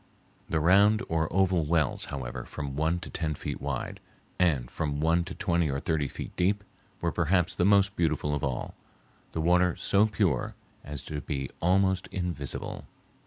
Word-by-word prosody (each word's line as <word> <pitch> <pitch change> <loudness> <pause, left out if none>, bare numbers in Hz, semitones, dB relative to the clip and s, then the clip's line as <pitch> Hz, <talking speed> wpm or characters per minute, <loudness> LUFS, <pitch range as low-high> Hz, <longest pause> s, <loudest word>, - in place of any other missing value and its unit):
The 80 - +1
round 100 +6 +5
or 80 -1 0
oval 95 -2 +3
wells, 75 -2 +1
however, 65 -4 -5
from 70 -3 -6
one 80 +4 +1
to - - -7
ten 80 -3 -2
feet - - -5
wide, 70 -3 -3 0.4
and 75 -9 +2
from 75 -3 -2
one 85 +3 +3
to 90 - -7
twenty 85 -4 +1
or 70 0 -1
thirty 75 -1 0
feet - - -7
deep, 100 +3 +1 0.4
were 85 - +1
perhaps 90 +2 +2
the 90 - +1
most 100 0 +4
beautiful 80 -3 0
of 75 - -2
all, 65 -3 -2 0.6
the 80 - -1
water 90 +1 +3
so 105 +2 +3
pure 95 - 0 0.3
as 70 -2 -6
to 75 -1 -5
be 70 -3 -4
almost 95 +1 +2
invisible. 85 -7 -3
85 Hz, 165 wpm, -28 LUFS, 75-90 Hz, 0.6 s, round